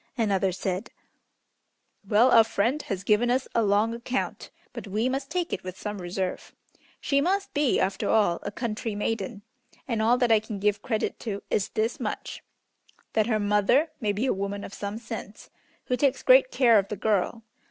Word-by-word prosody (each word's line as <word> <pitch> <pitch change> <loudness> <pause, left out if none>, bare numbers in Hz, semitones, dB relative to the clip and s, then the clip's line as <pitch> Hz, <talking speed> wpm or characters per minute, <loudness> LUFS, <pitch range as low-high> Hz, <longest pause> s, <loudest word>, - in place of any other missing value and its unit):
Another 195 -4 +1
said, 190 +4 -3 1.2
"Well, 230 +5 +5
our 225 - +8
friend 225 +6 0
has 195 -6 -4
given 215 +4 +3
us 255 +2 +1
a 230 - +3
long 210 +2 +2
account, 240 +2 -3 0.2
but - - -7
we 215 +5 0
must 270 +1 -3
take 355 -2 -2
it - - -3
with 185 0 -7
some 210 -2 -5
reserve. 180 +1 -4 0.4
She 280 -1 +1
must 390 +5 0
be, 290 -3 +2
after 190 0 -1
all, 205 -6 +3
a - - -4
country 225 -1 -3
maiden, 205 0 -3 0.4
and 230 -4 -1
all 235 +3 +4
that 245 -2 +2
I 220 - +6
can 215 -1 -7
give 205 +1 0
credit 220 -3 -2
to 205 -4 -5
is 200 - +1
this 225 +2 -1
much: - - -5 0.7
that 215 -1 +2
her 220 -3 +1
mother 210 +9 +2
may 210 -2 0
be 210 +5 -1
a 265 - +2
woman 200 +1 -4
of - - -8
some 205 +1 -5
sense, 220 -2 -8 0.3
who 250 - 0
takes 270 +1 +1
great - - +6
care 240 - +5
of 195 - -2
the 210 - -5
girl. 215 +2 0
220 Hz, 185 wpm, -26 LUFS, 200-245 Hz, 1.2 s, our